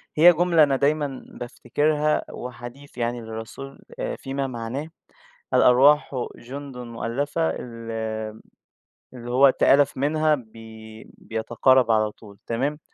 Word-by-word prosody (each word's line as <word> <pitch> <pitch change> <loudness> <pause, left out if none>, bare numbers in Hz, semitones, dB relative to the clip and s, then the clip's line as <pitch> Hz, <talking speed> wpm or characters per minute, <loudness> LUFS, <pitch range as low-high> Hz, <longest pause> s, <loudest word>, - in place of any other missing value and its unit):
هي 175 +3 +8
جملة 170 -1 +4
أنا 140 -2 +2
دايمًا 140 -1 0
بافتكرها، 150 +5 -1
هو 125 - -7
حديث 120 +4 -11
يعني 120 0 -2
للرسول 115 +5 -8 0.4
فيما 135 0 -3
معناه 130 +5 -5 0.7
الأرواح 140 +4 +5 0.2
جندٌ 135 +2 -9
مؤلفة 125 +7 -2
ال 115 -2 -7
آآ، 110 -1 -4 0.7
اللي 120 -1 -7
هو 135 +2 +6
تآلف 140 +2 +3
منها 155 +3 +2
بي 110 -2 -12
بيتقارب 120 +2 +2
على 110 -1 +2
طول 105 -2 -16
تمام، 135 +6 -1
125 Hz, 115 wpm, -24 LUFS, 115-145 Hz, 0.7 s, هي